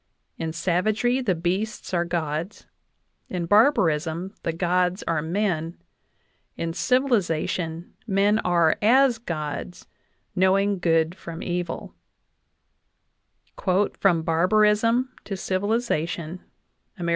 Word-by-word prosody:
In 160 -1 -2
savagery, 210 +9 +1
the 200 -8 0
beasts 185 +6 -3
are 175 -1 +1
gods; 170 +2 -3 0.6
in 180 -2 -3
barbarism, 180 - +2
the 165 - -1
gods 180 +2 0
are 165 -2 -1
men; 170 -1 -1 0.8
in 165 0 -3
civilization, 180 - 0
men 205 +1 +3
are 170 -4 +2
as 245 +2 +4
gods, 155 -4 -5 0.5
knowing 195 +1 +2
good 165 -1 +2
from 170 -3 -8
evil" 175 -1 -4 2.1
(From 170 -5 +3
Barbarism 215 +9 +2
to 195 - -5
Civilization, 185 -5 -2 0.5
Amer. 170 -1 -2
180 Hz, 95 wpm, -24 LUFS, 165-210 Hz, 2.1 s, as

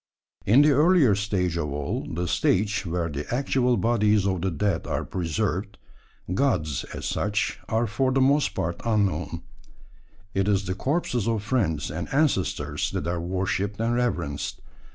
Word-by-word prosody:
In 125 +9 +7
the 150 - +5
earlier 150 - +5
stage 95 -4 -1
of 75 -4 -2
all 70 0 -3
the 90 +2 -2
stage 100 +3 +1
where 85 0 -1
the 75 -2 -5
actual 125 -1 +1
bodies 105 -3 +2
of 95 -3 0
the 95 - 0
dead 85 +1 -1
are - - -2
preserved 95 +3 -2 0.6
gods, 90 - 0
as - - -7
such, 105 +1 -1
are 115 +1 +1
for 125 +5 0
the 135 - +2
most 140 +2 +3
part 85 +1 -2
unknown: 90 -8 0 0.9
it 95 0 +1
is 100 -1 +2
the 95 - -1
corpses 125 - -1
of 110 -3 0
friends 90 - 0
and 80 +2 -5
ancestors 140 - 0
that - - -3
are 85 0 -1
worshipped 95 +3 -2
and 115 +1 +1
reverenced. 120 - -2
100 Hz, 155 wpm, -25 LUFS, 85-120 Hz, 0.9 s, In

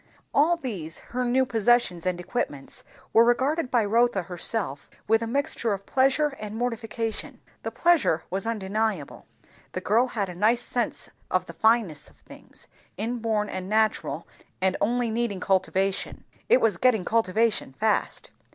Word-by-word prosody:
All 325 +4 +4
these 190 - -5 0.2
her 250 +1 0
new 255 +2 +2
possessions 225 -7 +2
and 180 -1 0
equipments 175 - -4 0.3
were 225 - +7
regarded 260 +5 +1
by 235 -4 +2
Rotha 230 -2 +2
herself 175 -3 -2 0.2
with 225 +1 +4
a 230 - -2
mixture 235 -3 0
of 195 0 -6
pleasure 270 +3 +3
and 210 0 -6
mortification. 225 -1 -3 0.2
The - - -3
pleasure 330 - +2
was 195 +4 -2
undeniable; 215 -5 -2 0.5
the - - -2
girl 230 +7 +3
had 210 -5 -2
a 180 - -7
nice 220 +7 +2
sense 240 -1 -2 0.2
of 185 0 +1
the - - -9
fitness 220 -10 +2
of - - -25
things, - - -16 0.3
inborn 220 -1 -1
and 185 -1 -5
natural 220 0 0 0.3
and 190 0 +2
only 240 +2 +1
needing 225 -4 -1
cultivation. 190 +1 0 0.3
It 255 - +6
was 215 -6 +2
getting 220 -4 +3
cultivation 225 -7 +1
fast. 215 +8 -1
220 Hz, 150 wpm, -26 LUFS, 190-240 Hz, 0.5 s, were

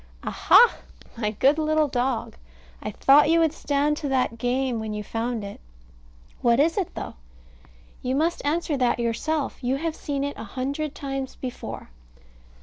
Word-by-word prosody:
Aha! 480 - +5 0.4
my 220 -3 -1
good 270 +8 +3
little 310 0 +2
dog! 250 -2 -1 0.5
I - - -4
thought 290 +2 +5
you 335 +1 +5
would 320 -2 +3
stand 295 -1 0
to 300 - -3
that 255 -3 0
game 245 0 0
when 215 -1 -4
you 210 - -4
found 225 +1 -3
it. 200 0 -8 0.8
What 235 0 +3
is 325 +3 +3
it, 385 -5 -2
though? - - -5 0.9
You 255 +1 -1
must 325 +4 0
answer 310 +1 0
that 250 -2 +2
yourself. 270 +6 -2
You 250 +2 +1
have 320 +3 -2
seen 280 -1 -3
it 285 0 -3
a - - -6
hundred 275 +7 -3
times 270 -1 -4
before. 250 - -7
270 Hz, 160 wpm, -25 LUFS, 245-305 Hz, 0.9 s, Aha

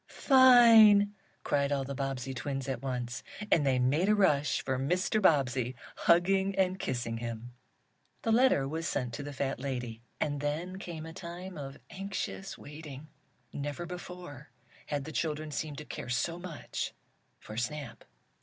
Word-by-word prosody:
"Fine!" 230 -6 +7 0.3
cried 140 0 +1
all 140 -1 +1
the 140 +1 -5
Bobbsey 135 -1 -3
twins 135 +1 -4
at 130 -3 -3
once, 125 -3 -3 0.3
and 155 - +5
they 135 -2 +2
made 145 +10 +2
a 215 - +5
rush 150 -8 +3
for 130 -1 0
Mr. 180 +9 +1
Bobbsey, 130 - +2 0.2
hugging 190 +3 +3
and 190 -1 +1
kissing 120 -2 -2
him. 115 +1 -6 0.7
The 225 - +1
letter 230 - +4
was 165 +4 -3
sent 125 -7 -2
to 145 - -4
the 145 0 -6
fat 135 -1 -2
lady, 125 -4 -4 0.2
and 145 -1 -1
then 165 +6 -3
came 165 -4 -7
a 160 - -8
time 180 +1 -8
of 140 -2 -7
anxious 195 0 -5
waiting. 150 0 -10 0.4
Never 145 +4 -4
before 175 -5 -9 0.4
had 145 -2 -2
the 160 - -6
children 155 -1 -2
seemed 150 -1 -4
to 150 - -7
care 125 - -7
so 165 +7 -1
much 175 -4 -5 0.5
for 110 - -10
Snap. 120 -1 -4
145 Hz, 155 wpm, -31 LUFS, 135-180 Hz, 0.7 s, Fine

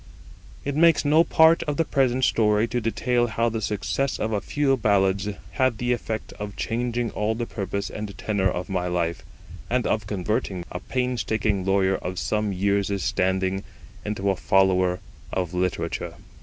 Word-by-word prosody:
It 140 0 -2
makes 165 -1 +4
no 155 +3 +5
part 160 0 +5
of 145 - -2
the 165 - +2
present 130 -2 +1
story 105 0 +3
to 120 - -1
detail 120 +2 +1
how 115 +1 0
the 115 0 -3
success 105 +6 -1
of 110 - -2
a 105 -2 0
few 140 +2 +1
ballads 100 -3 +2 0.2
had 130 -4 +1
the 125 +1 +1
effect 110 -2 -4
of 105 -1 -5
changing 120 0 -2
all 105 +1 -1
the 120 +1 -2
purpose 100 -2 -4
and 105 -2 -6
tenor 100 -3 0
of 90 0 -3
my 90 -2 -1
life, 85 -1 -1 0.5
and 125 0 +1
of 105 -2 0
converting 95 -2 -2
a 90 - -4
painstaking 110 -5 -1
lawyer 95 0 +2
of 90 0 -5
some 105 +1 0
years' 100 0 0
standing 95 -1 0 0.4
into 100 -1 -1
a - - -1
follower 95 -1 +2 0.3
of 90 -2 -2
literature. 90 -2 -2
105 Hz, 165 wpm, -24 LUFS, 95-120 Hz, 0.5 s, no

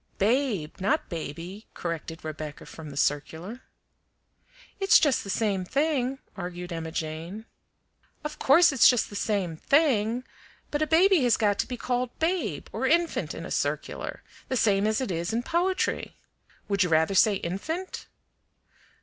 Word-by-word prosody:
"BABE, 210 - 0
not 290 +11 +1
baby," 170 +5 -6
corrected 165 -1 -5
Rebecca 155 -1 -6
from 160 -2 -10
the 140 - -9
circular. 160 - -1 1.2
"It's 390 +2 +6
just 290 -5 +2
the 200 - -8
same 195 -2 0
thing," 275 - 0 0.2
argued 180 -2 -6
Emma 165 -1 -4
Jane. 165 +7 -5 0.8
"Of 300 0 -6
course 325 +5 +6
it's 270 - +6
just 245 -4 +1
the - - -8
same 195 -6 -1
THING; 250 - +2 0.5
but 295 - -1
a 310 - +2
baby 355 +2 +5
has 240 - +4
got 205 -2 +1
to - - 0
be 250 - -5
called 245 0 -2
babe 345 +2 -1
or - - -1
infant 340 0 +1
in - - -6
a - - -8
circular, - - -3 0.3
the 260 - 0
same 205 -2 +3
as 220 +3 +1
it 255 - -2
is 170 +5 -2
in 235 +2 0
poetry! 360 +6 0 0.5
Would 200 -2 0
you 180 - +3
rather 160 +3 +3
say 200 +2 +5
infant?" 310 - -4
210 Hz, 155 wpm, -27 LUFS, 170-275 Hz, 1.2 s, It's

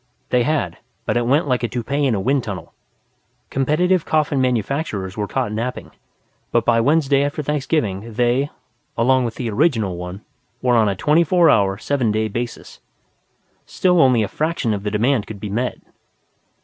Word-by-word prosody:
They 125 - +3
had, 120 - -1 0.3
but - - -1
it 120 -1 +1
went 145 +5 +2
like 125 -2 +1
a 120 - 0
toupee 140 +5 -1
in 120 - +1
a - - -1
wind 135 +5 +1
tunnel. 100 -3 -7 0.8
Competitive 155 +6 +2
coffin 150 -3 +1
manufacturers 120 - -1
were 105 -1 -2
caught 105 - -2
napping, 115 +4 -4 0.6
but - - +1
by 115 -1 +3
Wednesday 140 +1 +3
after 145 +1 -2
Thanksgiving 130 - -1
they, 125 +4 +1 0.5
along 130 +2 +3
with 115 - -4
the 125 - -4
original 105 - +1
one, 90 +3 -7 0.4
were 125 -1 +2
on 110 -3 +4
a 100 - -1
twenty 150 - +3
four 170 -1 +4
hour, 100 -2 +2
seven 125 0 0
day 110 +1 0
basis. 120 +3 -6 0.9
Still 180 -2 +2
only 125 -5 +4
a - - -1
fraction 155 -6 -1
of 100 - -3
the 105 - -2
demand 115 +2 +1
could 105 -2 -8
be 105 +1 -5
met. 120 +4 -1
125 Hz, 175 wpm, -20 LUFS, 105-145 Hz, 0.9 s, on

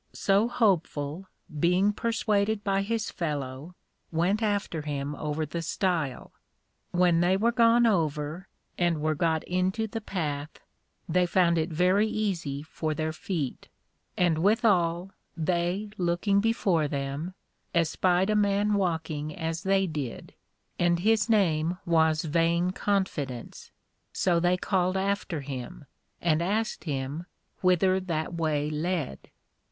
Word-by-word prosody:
So 200 +3 +2
Hopeful, 185 - 0 0.3
being 180 +5 +3
persuaded 215 -2 0
by 195 -1 +1
his 220 +2 -2
fellow, 145 0 -4 0.4
went 180 +6 +1
after 205 -6 -1
him 145 -1 -3
over 150 +1 -2
the 165 +3 -4
Stile. 165 -5 -2 0.6
When 175 -2 +3
they 180 +2 +3
were 230 +4 +2
gone 235 0 +5
over, 160 -3 0 0.3
and 175 -3 +2
were 155 +1 +1
got 160 0 0
into 185 +5 0
the 225 +1 -5
Path, 155 -7 -4 0.5
they 180 +2 +2
found 170 -2 +3
it 160 +2 -1
very 180 +6 +3
easy 170 -11 -2
for 155 0 -3
their 155 +1 -2
feet: 155 -6 -4 0.5
and 170 -3 +2
withal, 185 -3 +2 0.3
they 175 +5 -1
looking 175 +3 +2
before 200 -8 +1
them, 140 +5 -4 0.4
espied 180 +4 +2
a - - +2
man 205 0 +2
walking 160 -6 -1
as 165 +1 -3
they 195 0 +2
did, 150 -8 -5 0.5
(and 175 0 +2
his 220 +2 +2
name 175 -5 +2
was 160 -2 +3
Vain 170 +3 +1
confidence) 180 - -2 0.4
so 175 -2 +2
they 175 +1 +2
called 185 0 0
after 195 -4 -1
him, 130 - -7 0.3
and 165 -2 +2
asked 210 +5 -1
him 145 +3 -3 0.3
whither 185 +1 +3
that 170 -3 -3
way 155 -3 0
led? 155 - -3
175 Hz, 125 wpm, -27 LUFS, 155-195 Hz, 0.6 s, gone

